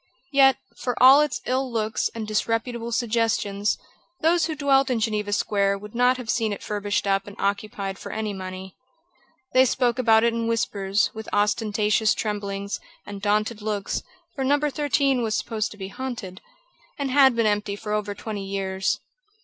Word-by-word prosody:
Yet, 270 -1 +5 0.2
for 245 -2 -2
all 265 +3 +8
its 300 - -1
ill 255 0 -1
looks 220 -1 0
and 220 -2 -4
disreputable 230 +2 -1
suggestions, 220 -3 0 0.4
those 330 +1 +3
who 320 - -3
dwelt 275 -2 +3
in 245 -3 +1
Geneva 210 -2 -1
Square 200 -1 +1
would 210 +1 -11
not 250 +2 +3
have 250 -3 -8
seen 220 0 0
it 205 - -5
furbished 205 -1 -1
up 195 0 +1
and 200 - -9
occupied 200 -1 -2
for - - -7
any 215 -1 -3
money. 185 0 -7 0.8
They 255 - +7
spoke 250 -1 +1
about 225 -2 +5
it 235 0 +3
in 230 0 -1
whispers, 200 -3 0
with 220 -1 -7
ostentatious 210 +1 +2
tremblings, 200 -1 -3 0.3
and 200 -1 -8
daunted 215 +2 0
looks, 210 -2 -2 0.3
for 270 - -3
No. 280 +2 +3
13 280 -3 +1
was 220 -2 0
supposed 220 -3 -2
to 210 - -12
be 190 -1 -6
haunted, 230 -6 -6 0.6
and 280 -3 -2
had 265 -2 +6
been 230 -1 +2
empty 205 -1 0
for 210 +1 -5
over 210 -1 -2
twenty 205 -2 -5
years. 195 -1 -2
220 Hz, 170 wpm, -24 LUFS, 205-250 Hz, 0.8 s, all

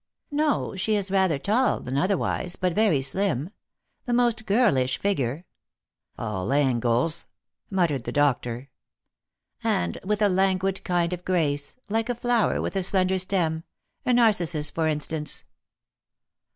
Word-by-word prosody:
" - - -52
No, 295 -7 0
she 210 +3 0
is 200 -2 -2
rather 190 -6 +2
tall 220 - +1
than 130 - -5
otherwise, 185 +2 0
but 180 -2 -1
very 200 -10 +2
slim. 180 0 -1 0.6
The 245 - 0
most 235 -2 +2
girlish 165 - +2
figure 160 -5 -1 0.2
" - - -66
" - - -47
All 105 -1 -3
angles," 130 +2 +1 0.4
muttered 170 - 0
the - - -3
doctor. 130 -2 0 0.9
"And 85 -1 0
with 210 +2 0
a - - +6
languid 190 0 +1
kind 175 -1 0
of 180 0 -6
grace, 150 - 0
like 225 +3 -1
a 245 - 0
flower 240 -2 +1
with 195 -1 -2
& - - -2
slender 190 -1 +1
stem 170 -4 0 0.2
— - - -52
a - - +1
narcissus, 175 -11 +3
for 160 -1 0
instance." 150 - -2
180 Hz, 150 wpm, -25 LUFS, 145-200 Hz, 0.9 s, a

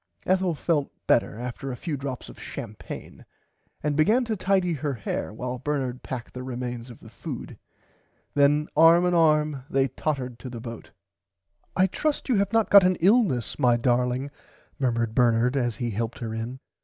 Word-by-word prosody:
Ethel 185 -2 +2
felt 150 -2 0
better 115 - +2
after 125 +2 -5
a - - -4
few 160 +1 -3
drops 135 -2 -5
of - - -12
champagne 110 - -8 0.6
and 150 0 0
began 215 - +3
to 225 -2 -1
tidy 190 -2 +1
her 145 -2 -2
hair 105 - -3
while 125 +3 -5
Bernard 135 -2 -2
packed 125 -3 -6
the 125 - -6
remains 125 -1 -5
of 120 - -12
the - - -13
food. - - -7 0.8
Then 145 +1 +3
arm 165 +3 +7
in 180 - +2
arm 150 -4 +3
they 135 0 +2
tottered 130 -3 -3
to 130 - -7
the 120 -1 -7
boat. 115 -1 -8 0.9
I 185 - +5
trust 290 - -2
you 245 - +3
have 200 0 +1
not 225 -1 +2
got 200 -1 +9
an 185 0 +3
illness 180 - +2
my 120 -3 +4
darling 125 +3 0 0.5
murmured 115 -4 0
Bernard 120 +1 +3
as 120 -4 0
he 120 -3 -3
helped 115 +3 -3
her 115 -3 -5
in. 115 +3 -5
135 Hz, 175 wpm, -26 LUFS, 120-165 Hz, 0.9 s, got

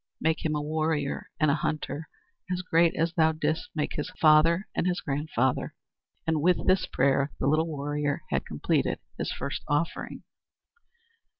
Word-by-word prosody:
Make 160 0 0
him 155 -1 0
a 150 - -1
warrior 155 -2 -1
and 155 -2 +4
a - - +3
hunter 155 0 -3 0.4
as 180 0 -1
great 170 -1 +3
as 165 +2 0
thou 160 -3 +3
didst 155 +1 -1
make 150 - -1
his 150 - -3
father 165 +4 +5
and 180 - 0 0.2
grandfather." 135 -3 0 0.5
And 160 -2 +1
with 180 +3 +2
this 185 0 +3
prayer 140 0 +2
the - - -1
little 155 +3 +3
warrior 145 -1 -2
had - - +1
completed - - 0 0.2
his - - -2
first - - -4
offering. 145 +3 -2
155 Hz, 155 wpm, -28 LUFS, 145-165 Hz, 0.5 s, father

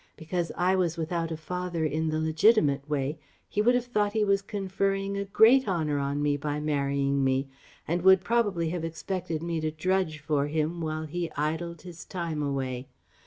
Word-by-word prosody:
Because 165 +1 -2
I 185 +2 +3
was 175 -2 0
without 165 0 -2
a 160 - -3
father 175 0 -3
in 155 +1 0
the 155 0 -1
legitimate 155 -3 +3
way 145 0 -1 0.3
he 210 - 0
would 245 +3 +4
have 245 -1 0
thought 210 -4 0
he 220 -1 +2
was 200 -1 +2
conferring 195 0 -2
a 200 0 -2
great 230 +6 +5
honour 155 -6 0
on 140 +1 -1
me 145 -1 +2
by 145 +1 -2
marrying 140 -2 0
me, 135 +1 +1 0.4
and 175 +2 0
would 190 +1 +6
probably 200 -6 +1
have 170 0 -3
expected 165 0 -3
me 170 -1 -2
to 155 - 0
drudge 160 0 0
for 145 -1 0
him 160 +3 -1
while 155 0 -2
he 170 +2 -3
idled 160 +3 -3
his 175 -2 -9
time 170 -5 -4
away.... 135 -3 -2
165 Hz, 185 wpm, -28 LUFS, 150-190 Hz, 0.4 s, would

